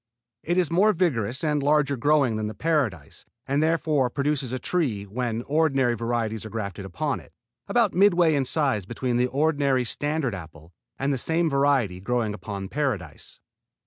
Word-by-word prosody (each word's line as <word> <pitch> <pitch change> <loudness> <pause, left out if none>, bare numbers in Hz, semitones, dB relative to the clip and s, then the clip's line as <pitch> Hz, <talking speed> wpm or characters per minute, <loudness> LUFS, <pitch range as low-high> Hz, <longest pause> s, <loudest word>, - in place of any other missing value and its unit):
It 175 +2 -1
is 175 -4 +2
more 205 +5 +4
vigorous 130 - -1
and 150 -2 +1
larger 145 -1 +2
growing 140 -2 +2
than 110 0 -2
the 110 - -6
Paradise, 130 - -1 0.2
and, 140 +2 0
therefore, 155 -5 +1
produces 140 -1 -1
a 130 - -2
tree, 125 - -1
when 115 +2 -3
ordinary 140 -5 +2
varieties 115 -2 -2
are 110 - -7
grafted 100 -4 -5
upon 90 -3 -2
it, - - -17 0.4
about - - +2
midway 175 -4 +4
in 140 -2 +1
size 130 - 0
between 120 +1 -2
the 125 +1 +2
ordinary 140 -2 +1
standard 145 0 -1
apple 80 -2 -10 0.2
and 140 +1 0
the 135 - -1
same 165 +3 0
variety 135 -9 +2
growing 115 0 -1
upon 100 -1 -6
Paradise. 105 - -4
130 Hz, 165 wpm, -25 LUFS, 110-150 Hz, 0.4 s, more